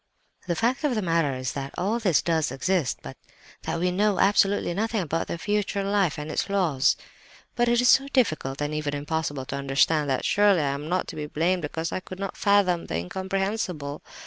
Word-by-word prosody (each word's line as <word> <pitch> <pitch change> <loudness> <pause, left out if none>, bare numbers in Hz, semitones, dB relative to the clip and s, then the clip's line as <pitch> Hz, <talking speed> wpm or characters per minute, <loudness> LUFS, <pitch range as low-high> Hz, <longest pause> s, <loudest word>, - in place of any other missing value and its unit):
"The 170 - 0
fact 240 - 0
of 285 -5 +1
the 215 - -1
matter 165 -5 +1
is 130 -1 -3
that 140 -1 -6
all 215 +6 0
this 185 -9 +2
does 160 -2 +1
exist, 170 0 -1
but - - -9 0.4
that - - -3
we 180 +1 +1
know 200 +1 +1
absolutely 200 -2 +3
nothing 220 +2 -1
about 165 -1 -2
the - - -3
future 205 +1 -1
life 195 -5 +1
and 150 +1 -5
its 155 - -1
laws! 170 -9 +2 0.6
"But 240 0 +2
it 240 0 +3
is 250 - +4
so 275 - +5
difficult, 155 - 0
and 145 +1 -2
even 150 -1 -2
impossible 145 -2 -3
to 140 - -4
understand, 140 +2 +2
that 130 - 0
surely 205 -4 +4
I 140 -2 0
am 145 +3 -6
not 185 +1 0
to - - -7
be 150 -1 -4
blamed 175 +5 0
because 160 +2 -3
I - - -2
could 185 0 -10
not 195 0 -4
fathom 195 -4 +2
the - - -3
incomprehensible? 190 - -3
175 Hz, 205 wpm, -25 LUFS, 150-200 Hz, 0.6 s, so